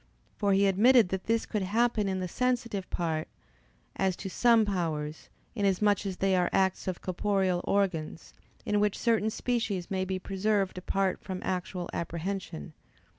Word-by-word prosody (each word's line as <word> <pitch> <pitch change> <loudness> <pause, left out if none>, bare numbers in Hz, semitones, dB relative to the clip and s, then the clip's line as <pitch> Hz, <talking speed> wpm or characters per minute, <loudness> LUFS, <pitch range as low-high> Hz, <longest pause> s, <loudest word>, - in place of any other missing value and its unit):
For 200 -2 +1
he 195 +1 +4
admitted 215 +2 +5
that 190 0 -3
this 230 0 +1
could 210 - -2
happen 215 +2 +1
in 190 -1 -1
the 180 - -2
sensitive 235 -3 -1
part, 160 -2 -2 0.7
as 190 -2 +1
to 190 - -6
some 230 -1 +4
powers, 160 -6 -3 0.2
inasmuch 205 -1 +1
as 185 -2 -4
they 195 -1 +2
are 180 -1 +2
acts 190 -1 +1
of 185 -2 -3
corporeal 185 -1 0
organs, 180 -6 -1 0.3
in 210 - +1
which 210 -1 +1
certain 225 -2 +2
species 220 -6 -2
may 190 -1 0
be 190 0 -2
preserved 195 0 -1
apart 190 +1 -1
from 185 -1 -5
actual 180 -1 -3
apprehension. 170 - -4
195 Hz, 155 wpm, -29 LUFS, 180-210 Hz, 0.7 s, admitted